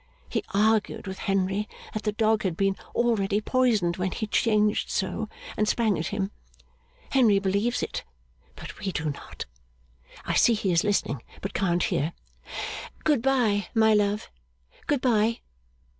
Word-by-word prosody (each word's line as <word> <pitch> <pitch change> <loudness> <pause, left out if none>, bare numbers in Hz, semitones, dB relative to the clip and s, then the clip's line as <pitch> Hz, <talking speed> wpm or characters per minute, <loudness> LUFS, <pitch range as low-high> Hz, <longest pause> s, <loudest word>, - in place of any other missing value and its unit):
He - - -2
argued 215 +1 +2
with 190 -1 -6
Henry 195 +1 0 0.2
that 215 - -2
the 210 - 0
dog 220 0 +2
had 180 -4 -2
been 195 -1 +2 0.2
already 210 -4 +2
poisoned 215 -7 +2
when 185 0 0
he 215 - -3
changed 210 -1 +2
so, - - -2 0.3
and 210 - +1
sprang 220 -5 +2
at 160 - -2
him. 200 -1 -2 0.8
Henry 235 -7 +5
believes 200 +5 0
it, - - -4 0.5
but - - -9
we 195 - -2
do 160 -3 -1
not. 140 - -8 0.8
I - - -1
see 235 - +5
he 205 -3 0
is 170 +2 +3
listening, 200 - 0 0.2
but 195 - -5
can't 175 -3 +1
hear. 155 +4 0 0.9
Good 295 -6 +3
bye, 230 -7 +2
my 220 -1 +5
love! 210 0 +1 0.6
Good 290 -3 +1
bye! 230 -2 +2
210 Hz, 150 wpm, -26 LUFS, 195-225 Hz, 0.9 s, Henry